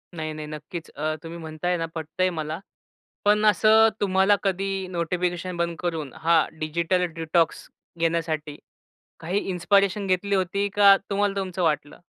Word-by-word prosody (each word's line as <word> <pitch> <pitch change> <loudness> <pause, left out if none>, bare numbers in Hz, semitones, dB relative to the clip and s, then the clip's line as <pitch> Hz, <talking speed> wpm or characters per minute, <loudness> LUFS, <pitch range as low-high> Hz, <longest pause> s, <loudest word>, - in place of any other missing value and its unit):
नाही, 155 -1 -4
नाही. 155 0 -7
नक्कीच. 155 +2 -8
अ, 155 +2 -2
तुम्ही 165 +1 -7
म्हणताय 160 +2 -2
ना 165 - -2
पटतंय 160 +4 -1
मला. 155 -1 -4 0.7
पण 210 +1 +4
असं 215 +2 +6
तुम्हाला 190 0 +4
कधी 195 0 -1
नोटिफिकेशन 175 +1 -2
बंद 170 0 -1
करून, 160 -6 -3
हा 165 -1 +3
डिजिटल 170 +4 0
डिटॉक्स 165 0 0 0.3
घेण्यासाठी 160 -3 -1 0.6
काही 175 +5 -1
इन्स्पायरेशन 200 +2 +2
घेतली 195 +2 +1
होती, 195 +2 0
का 200 -1 +7
तुम्हाला 200 0 +1
तुमचं 185 -2 -2
वाटलं? 150 -3 -1
175 Hz, 140 wpm, -25 LUFS, 160-195 Hz, 0.7 s, का